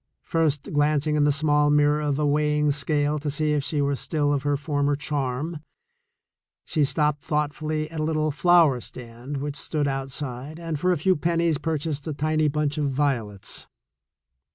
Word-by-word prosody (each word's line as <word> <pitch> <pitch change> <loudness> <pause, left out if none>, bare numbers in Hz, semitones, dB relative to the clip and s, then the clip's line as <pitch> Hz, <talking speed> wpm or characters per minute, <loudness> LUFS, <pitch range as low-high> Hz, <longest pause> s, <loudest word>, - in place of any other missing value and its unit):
First 155 -4 0
glancing 150 +1 +2
in 150 -1 +3
the 145 - +4
small 145 0 +2
mirror 150 0 +3
of 145 -2 0
a 150 - +1
weighing 150 0 +2
scale 145 +1 0
to 150 +1 -3
see 150 +2 0
if 145 -2 0
she 145 0 0
were 140 0 +1
still 145 +1 0
of 140 - 0
her 145 0 0
former 145 -1 0
charm, 145 +2 -3 1.1
she 155 - +1
stopped 150 0 +1
thoughtfully 155 +1 -2
at 160 - -5
a - - 0
little 155 -1 0
flower 160 -5 +4
stand 125 +4 -8
which 145 +1 -4
stood 150 -1 -1
outside, 135 +1 -4
and 165 -3 -4
for 180 +4 +2
a 180 - +2
few 185 +5 +2
pen 170 +3 0
nies 165 -3 +1
purchased 155 -2 -2
a 155 - -2
tiny 155 +1 +1
bunch 150 0 -1
of 145 -2 +1
violets. 125 -8 -2
150 Hz, 175 wpm, -25 LUFS, 140-155 Hz, 1.1 s, the